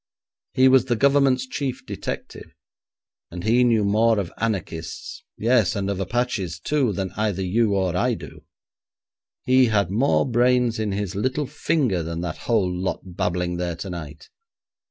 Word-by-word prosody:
He 130 0 +5
was 130 -1 +5
the 120 -2 0
Government's 135 0 +3
chief 130 0 -4
detective, - - -7 0.7
and 90 0 -7
he 120 +4 +3
knew 115 -3 +3
more 110 +3 +3
of 95 -4 -3
anarchists, 95 -7 -4
yes, 115 -1 +2
and 100 0 -1
of 95 - -3
Apaches, 100 -4 -2
too, 140 -6 +1
than 95 -1 -3
either 100 -2 -1
you 105 +3 +1
or 95 -2 0
I 120 +5 +1
do. - - -11 1.0
He 130 0 +5
had 100 -5 +1
more 125 +8 +2
brains 120 -1 +2
in 110 -2 -1
his 100 -1 -3
little 130 +8 -1
finger 135 - 0
than 85 +1 -4
that 85 -3 -4
whole 100 -6 +2
lot 95 +1 -2
babbling 90 0 -1
there 90 -1 -2
tonight. 85 -5 -8
105 Hz, 155 wpm, -23 LUFS, 90-125 Hz, 1.0 s, He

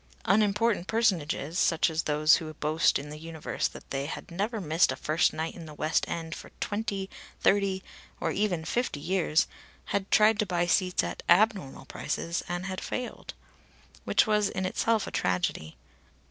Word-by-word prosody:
Unimportant 210 0 +2
personages, 175 - 0
such 165 +1 +3
as 160 -1 0
those 155 +1 +4
who 155 -1 -6
boast 155 +2 +2
in 145 +1 -7
the 150 - -8
universe 165 -1 -3
that - - -12
they 140 +1 -2
had 165 - -7
never 210 +6 -2
missed 165 0 +2
a - - -3
first 155 +3 +2
night 160 +1 -3
in 165 -2 -10
the 150 - -10
West 155 +2 +1
End 165 -1 -4
for - - -9
twenty, 205 -2 -2 0.3
thirty, 195 -1 +2 0.4
or - - -1
even 185 -6 0
fifty 240 -10 -1
years, 170 -1 +2 0.5
had 200 0 -1
tried 215 0 +5
to 215 - +2
buy 175 -1 +1
seats 180 +1 +2
at - - -4
abnormal 180 -8 +3
prices, 170 +5 -3
and 175 +1 -3
had 190 -1 -4
failed; 250 -1 -5 0.7
which - - +3
was 210 -2 +2
in 190 - -3
itself 220 +3 +1
a - - -7
tragedy. 90 -5 -1
175 Hz, 170 wpm, -28 LUFS, 155-205 Hz, 0.7 s, tried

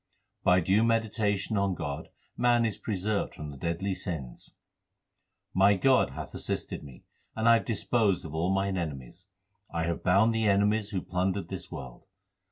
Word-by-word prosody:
By 90 0 +5
due 95 +6 +3
meditation 110 -2 +1
on 100 -2 +1
God 70 -3 -5 0.3
man 120 -1 +3
is 110 - -2
preserved 105 0 -2
from 75 -1 -7
the 70 - -10
deadly 85 +5 -2
sins: 80 -11 -6 1.0
My 100 +2 +5
God 130 +7 +4
hath - - -8
assisted - - -4
me, 70 -4 -13 0.3
and 110 +1 0
I 115 - +8
have - - -9
disposed 110 -4 +1
of 80 - -7
all 85 +4 0
mine 95 -1 0
enemies. 80 +3 -6 0.4
I 85 -1 -2
have 85 0 -2
bound 100 +6 +4
the 110 -1 +1
enemies 105 +1 +2
who 95 -4 -3
plundered 90 0 -1
this 95 - -7
world. 65 -7 -9
95 Hz, 165 wpm, -29 LUFS, 85-110 Hz, 1.0 s, I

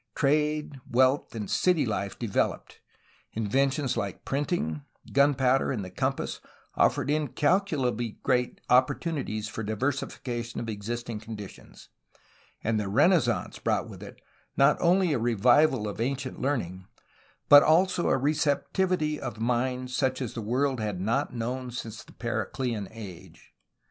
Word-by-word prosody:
Trade, 150 0 +1
wealth, 130 +1 +2
and 105 -2 -4
city 180 -6 +2
life 100 -3 -3
developed; 115 -5 -2 0.5
inventions 130 +5 0
like 100 -2 -4
printing, 135 - -1 0.3
gunpowder, 135 -2 +3
and 110 -7 -3
the 90 - -9
compass - - -2 0.3
offered - - +2
incal 150 - +2
culably 125 - -2
great 125 -2 0
opportunities 130 -3 +1
for 115 - -5
diversification 120 +1 -3
of 115 - -5
existing 115 +2 -4
conditions; 105 -3 -10 0.7
and 110 0 +1
the 105 - -2
Renaissance 140 - +2
brought - - 0
with - - -11
it - - -10 0.4
not 140 +2 +5
only 180 -1 +3
a 130 - 0
revival 120 +2 +3
of 105 +2 -5
ancient 135 +2 -3
learning 95 -10 -2 0.6
but 145 0 +10
also 175 +3 +3
a - - +3
receptivity 155 +3 0
of 120 -4 -6
mind 125 +2 -1
such 130 0 0
as 125 -5 -4
the 115 - -4
world 130 +4 0
had 105 -4 -3
not 115 +10 0
known 125 +2 -3
since 115 -1 -7
the - - -17
Periclean 115 -1 -3
Age. 105 -6 -11
125 Hz, 135 wpm, -27 LUFS, 110-145 Hz, 0.7 s, but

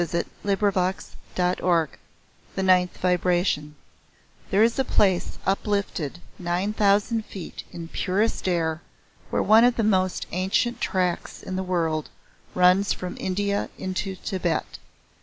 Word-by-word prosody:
"THE 170 0 -1 0.2
ROUND 200 0 +2
FACED 185 0 -1 0.2
BEAUTY" 180 -3 +2 0.7
THE 190 - -1
NINTH 180 -1 +3
VIBRATION 175 -4 +1 0.7
There 200 +3 +4
is 235 +3 +2
a - - +4
place 190 -7 +1
uplifted 195 -6 -1 0.2
nine 180 +4 -1
thousand 210 +2 +2
feet 185 -5 -8
in 165 -1 -7
purest 195 +5 -1
air 165 -2 0 0.5
where - - +1
one 220 +2 +6
of 245 0 +4
the 225 - 0
most 185 -3 +1
ancient 195 +7 0
tracks 180 -3 -1
in 185 - -4
the 190 - -1
world 165 -4 -1 0.5
runs 180 +2 +4
from 180 -1 -6
India 200 +2 -1
into 190 +1 -3
Tibet. 180 -3 -2
185 Hz, 130 wpm, -25 LUFS, 175-200 Hz, 0.7 s, one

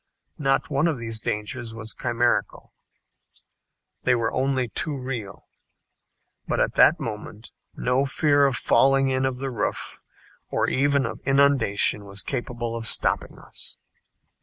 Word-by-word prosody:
Not 135 +1 +1
one 145 +4 +2
of 160 -5 0
these 115 -2 -4
dangers 115 +3 -4
was 110 0 -6
chimerical. 120 0 -1 1.3
They 125 - +3
were 115 -1 -1
only 130 -1 0
too 145 +5 -3
real. 125 -7 -6 1.0
But - - -1
at - - +1
that - - +5
moment 105 0 -7 0.2
no 130 +3 +1
fear 145 0 +3
of 135 - -1
falling 135 +3 +3
in 130 0 +1
of 130 -1 -3
the 135 +1 -4
roof, 110 -4 -3 0.5
or - - 0
even 140 0 +2
of - - -5
inundation 135 -7 +2
was 100 0 -4
capable 120 -3 -4
of 115 -1 -1
stopping - - +2
us. - - -5
125 Hz, 135 wpm, -24 LUFS, 115-135 Hz, 1.3 s, that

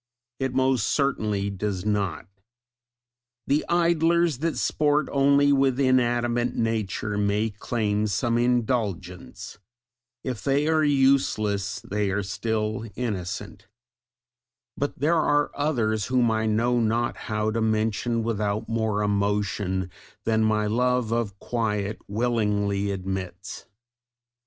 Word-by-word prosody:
It 130 -1 -2
most 130 -4 +2
certainly 105 -8 0
does 100 -1 -3
not! 100 -5 -1 1.2
The 145 +2 +1
Idlers 170 -3 +2
that 165 +1 -1
sport 150 0 +1
only 140 +1 +4
with 135 -1 +2
inanimate 120 -2 +2
nature 110 -2 -1
may 105 +2 +1
claim 105 0 -1
some 115 +3 0
indulgence; 110 -7 -2 0.6
if 125 -6 -4
they 140 +2 +1
are 160 -1 +3
useless, 130 -8 +2
they 105 0 -2
are 100 +1 -1
still 110 +2 -2
innocent; 105 -2 -4 1.1
but 145 - -3
there 150 +5 +2
are 145 -1 +2
others, 115 -8 0
whom 125 -2 +2
I 110 0 0
know 120 +3 +2
not 115 +1 0
how 105 0 0
to 115 +1 -1
mention 110 +1 0
without 105 -2 -1
more 110 -2 0
emotion 100 -2 -1 0.3
than 110 0 +2
my 110 -1 +2
love 125 +1 +1
of 115 -4 -1
quiet 105 -3 -2
willingly 105 -3 0
admits. 95 0 -5
110 Hz, 115 wpm, -25 LUFS, 105-125 Hz, 1.2 s, only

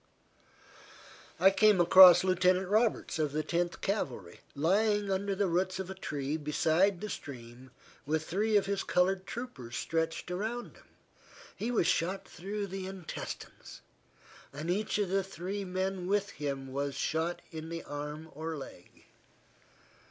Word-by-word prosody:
I 190 +3 +7
came 205 0 +4
across 180 +1 +9
Lieutenant 185 0 +2
Roberts, 215 -5 +1
of 150 -2 0
the 155 +1 0
Tenth 175 +1 -1
Cavalry, 130 - -3 0.2
lying 205 +6 +2
under 195 +1 -1
the 200 +1 +1
roots 185 +1 0
of 190 0 -5
a - - -4
tree 145 -5 -3
beside 160 +5 +2
the 210 - -3
stream 125 - -9 0.3
with 155 +2 -1
three 210 +5 +2
of 200 - +2
his 200 0 -1
colored 185 +1 +1
troopers 135 - -6
stretched 165 +1 -2
around 220 +6 -4
him. - - -21 0.7
He 225 - -3
was 235 -8 +2
shot 180 +3 0
through 200 +3 -5
the 190 -1 -5
intestines, 190 -3 -8 0.7
and 155 +5 -3
each 210 +4 0
of 205 -3 0
the 195 +1 +1
three 195 +2 -5
men 185 0 -2
with 205 +1 0
him 135 -2 -5
was 140 0 -2
shot 160 +4 -1
in 160 -1 -7
the 165 0 -5
arm 150 +2 -6
or 160 +1 -5
leg. 110 -10 -12
180 Hz, 145 wpm, -31 LUFS, 155-195 Hz, 0.7 s, across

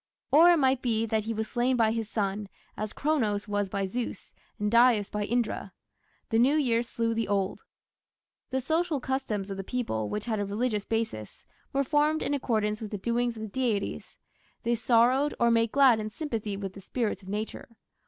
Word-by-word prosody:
Or 330 +4 +8
it 345 - +5
might 265 -3 +2
be 225 -2 +1
that 220 -1 -1
he 225 - -2
was 220 0 -2
slain 245 +2 +1
by 225 -2 +3
his 225 -1 -3
son, 200 -1 -2 0.3
as 215 0 -4
Cronos 220 -10 0
was 205 -1 -1
by 195 +1 -1
Zeus 235 +5 -5 0.2
and 210 0 -1
Dyaus 235 -3 +4
by 210 -1 -2
Indra. 225 -4 -1 0.6
The 225 - +3
new 265 +5 +4
year 245 -6 +2
slew 230 -1 -1
the 225 0 -1
old 195 -1 0
year. - - -32 0.8
The 265 0 -1
social 325 -1 +1
customs 245 -7 -2
of 195 - -4
the 195 - -4
people, 185 - -2
which 210 - -3
had 220 -3 -1
a - - 0
religious 210 0 -1
basis, 225 - -3 0.3
were 275 0 +1
formed 300 +3 +2
in - - -1
accordance 215 -6 0
with 215 - -5
the 205 - -4
doings 235 +3 -1
of 220 - -6
the - - -4
deities; 220 -2 -2 0.5
they 235 0 +1
sorrowed 245 +4 +3
or 235 0 +4
made 230 -1 +2
glad 265 -5 +5
in 215 0 -3
sympathy 220 -6 -4
with 195 -2 -5
the 195 - -11
spirits 225 +2 -2
of 190 - -12
nature. 210 +2 -4
230 Hz, 200 wpm, -28 LUFS, 210-255 Hz, 0.8 s, Or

